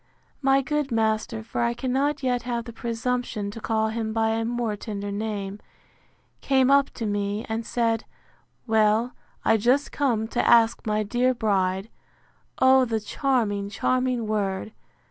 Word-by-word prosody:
My 270 0 +3
good 295 0 -1
master 220 0 0
(for 230 - -3
I 235 0 +1
cannot 270 +3 -1
yet 250 -1 +1
have 235 -1 -3
the 235 - -8
presumption 230 -2 -2
to 225 - -9
call 220 0 0
him 220 -1 -3
by 225 0 +1
a 225 +1 0
more 235 -2 -1
tender 205 -1 -5
name) 205 -1 -4 0.8
came 265 -1 +3
up 280 0 +5
to 230 - -4
me, 205 +1 -2
and 225 +1 -2
said, 230 -1 0 0.6
Well, 220 +1 +2 0.3
I 225 - +5
just 255 +7 +2
come 235 -6 0
to - - 0
ask 230 -1 +4
my 215 0 +1
dear 250 +4 +1
bride 195 -3 0 0.7
(O 260 0 +6
the 225 -3 -1
charming, 215 -3 -1
charming 255 +2 0
word!) 205 -1 -2
225 Hz, 150 wpm, -25 LUFS, 215-250 Hz, 0.8 s, O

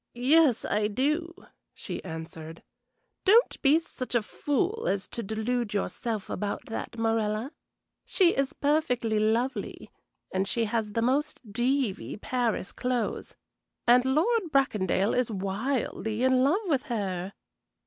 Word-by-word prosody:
"Yes, 270 +1 +4
I 210 0 +1
do," 300 - 0 0.4
she - - -6
answered. 160 -1 -8 0.6
"Don't 450 +5 +4
be 285 +2 +5
such 255 -6 -6
a 235 - +3
fool 365 - -1
as 195 0 0
to 235 - -5
delude 220 +1 -2
yourself 215 +1 -2
about 205 -1 -3
that, 230 +1 -5
Morella. 225 +2 0 0.5
She 360 -3 +3
is 275 -1 0
perfectly 250 -7 +1
lovely, 225 +1 -1 0.4
and 190 +1 0
she 230 +2 0
has 215 -1 -2
the 230 - 0
most 285 +5 0
deevie 240 -4 0
Paris 240 -5 -1
clothes, 250 -2 -2 0.5
and 245 +1 +6
Lord 335 - +1
Bracondale 210 - +2
is 250 -2 +1
wildly 220 +3 -2
in 260 0 +4
love 320 +10 +3
with 290 -8 +1
her." 195 -4 -2
240 Hz, 130 wpm, -28 LUFS, 210-275 Hz, 0.6 s, and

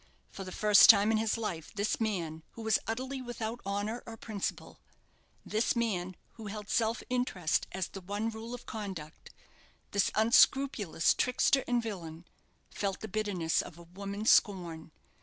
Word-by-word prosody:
For 195 - -7
the 185 - -8
first 210 +1 +6
time 210 0 +8
in 220 - +3
his 220 +1 0
life 175 -9 -4
this 205 +1 0
man, 170 -8 -2
who 230 - -8
was 220 -1 +3
utterly 260 +4 -3
without 240 -1 -5
honour 205 +4 -2
or 225 -1 -8
principle 210 -3 -5 0.7
this 220 +4 0
man, 185 -6 -1 0.2
who 220 -2 -8
held 210 0 -7
self 225 0 +1
interest 245 -10 0
as 190 -1 -2
the 195 - -9
one 205 +5 -3
rule 225 +2 -6
of 245 - -12
conduct 190 -8 -7 0.6
this 200 -1 +2
unscrupulous 220 - +4
trickster 255 +2 +2
and 245 -1 +1
villain, 170 -6 -6 0.5
felt 195 -2 -3
the 220 - -5
bitterness 195 -6 0
of 170 - -11
a 170 - -12
woman's 200 +5 -1
scorn. 175 -6 +2
210 Hz, 160 wpm, -31 LUFS, 185-225 Hz, 0.7 s, time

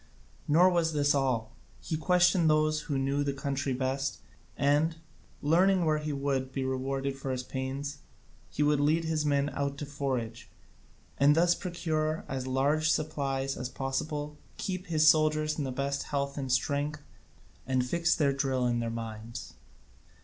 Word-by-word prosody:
Nor 175 +5 +5
was 165 -2 +1
this 145 -1 +3
all; 125 -5 0 0.3
he 160 - -3
questioned 175 +1 +3
those 155 0 +3
who 140 - +1
knew 140 +2 0
the 140 -1 -1
country 140 0 -2
best, 135 +2 -1 0.4
and, 145 +3 +2 0.5
learning 180 +4 +4
where 155 -1 +2
he 150 0 -3
would 135 -2 -1
be 135 0 -2
rewarded 135 +1 -2
for 135 0 -6
his 130 -1 -2
pains, 135 +2 -4 0.5
he 150 - 0
would 150 -1 +3
lead 155 +3 +2
his 155 -2 0
men 140 0 +1
out 140 0 -2
to 145 - -4
forage, 130 -5 -3 0.7
and 145 +1 +6
thus 170 +1 +4
procure 160 -4 -2
as 130 -1 -4
large 145 +5 +2
supplies 140 -4 -1
as 125 - -4
possible, 145 +3 -3 0.2
keep 185 0 -4
his 155 -2 +3
soldiers 155 0 +3
in 145 - -1
the 130 - -3
best 140 +1 -2
of - - -8
health 140 -1 -1
and 135 -3 -3
strength, 145 +3 0 0.6
and 130 -1 +1
fix 170 +6 +1
their 140 -3 +2
drill 135 -2 0
in 120 -1 +1
their 115 -1 -2
minds. 115 -3 -6
140 Hz, 165 wpm, -29 LUFS, 135-155 Hz, 0.7 s, and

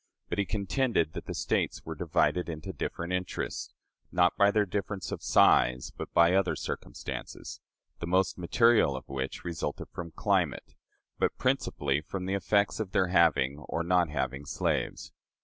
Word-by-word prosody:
But - - -2
he 100 - +2
contended 100 - 0
that - - -7
the - - -4
States - - -1
were - - -4
divided 90 -1 +1
into 80 -2 -6
different 85 +2 -4
interests, 90 0 -3 0.4
not - - +3
by 100 0 +5
their 105 0 +2
difference 100 0 -4
of - - -4
size, 65 0 +4
but - - -6
by 85 +1 +5
other 95 -1 +2
circumstances; - - -6 0.4
the 85 - -4
most 95 +1 +2
material 110 - +3
of 65 - -7
which 65 0 -4
resulted 85 -2 -4
from 85 -1 -6
climate, 90 -2 0 0.5
but - - +1
principally 70 0 0
from 90 +4 -5
the 95 - -1
effects 100 +2 +1
of 100 -4 -4
their 95 -1 +2
having 80 -6 +3
or 85 - -1
not 90 -1 +2
having 70 -1 -2
slaves. 70 - -2
90 Hz, 160 wpm, -29 LUFS, 75-100 Hz, 0.5 s, by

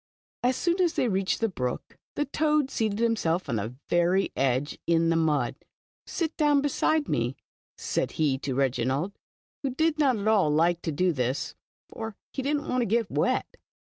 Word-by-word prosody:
" - - -79
As 250 +1 +3
soon 345 +6 +1
as 345 -3 +2
they 255 - +1
reached 190 -1 0
the 225 - +3
brook, 125 - -4 0.2
the 295 - 0
toad 300 -1 +1
seated 215 -3 0
himself 215 -7 +1
on 115 - -1
the 110 +4 -4
ver}^ 175 +3 +2
edge, 135 +2 0
in 165 0 +3
the 165 - +2
mud. 150 -7 +1 0.5
Sit 325 -2 -2
down 295 -2 +4
beside 290 +2 +1
me," 120 +3 0 0.4
said - - -2
he 145 -4 +1
to 135 -2 -3
Reginald. 135 +6 0 0.5
who 275 - -1
did 315 +4 0
not 265 -6 +3
at 205 +1 -3
all 205 -8 +4
like 170 +3 +2
to 160 - -2
do 180 +4 +1
this, 130 0 -2 0.3
for 220 -2 -6 0.2
he 270 - -2
did 285 +3 0
n't 290 - -6
want 255 0 +1
to 235 - 0
get 225 +1 +1
wet. - - 0
190 Hz, 190 wpm, -27 LUFS, -, 0.5 s, down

